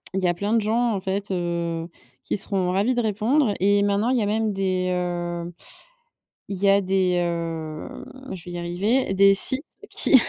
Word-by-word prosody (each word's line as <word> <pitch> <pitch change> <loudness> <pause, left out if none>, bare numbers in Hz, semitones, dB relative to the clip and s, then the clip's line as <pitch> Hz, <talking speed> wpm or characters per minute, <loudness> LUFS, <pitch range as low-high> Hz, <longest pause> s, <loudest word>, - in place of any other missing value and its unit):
il 190 - 0
y - - +3
a 175 - +2
plein 200 +5 -2
de 225 - +3
gens 230 +2 +1
en 195 - -2
fait, 195 +2 -3
heu, 170 -2 -2 0.4
qui - - -2
seront 190 -2 0
ravis 205 +7 +1
de 240 - +1
répondre 220 +3 +1
et 200 +1 +3
maintenant 205 +3 +1
il 255 - +2
y 225 - +1
a - - 0
même 220 +1 0
des, 185 -1 0
heu, 175 -1 -3 1.0
il 195 - -3
y - - +5
a 200 +1 +5
des, 190 -1 +1
hem 165 -3 -3 0.3
je 175 -3 -9
vais 175 - -8
y 175 - -5
arriver, 195 +7 0
des 195 +1 +6
sites 260 +7 +4 0.3
qui - - +4
195 Hz, 200 wpm, -24 LUFS, 175-210 Hz, 1.0 s, des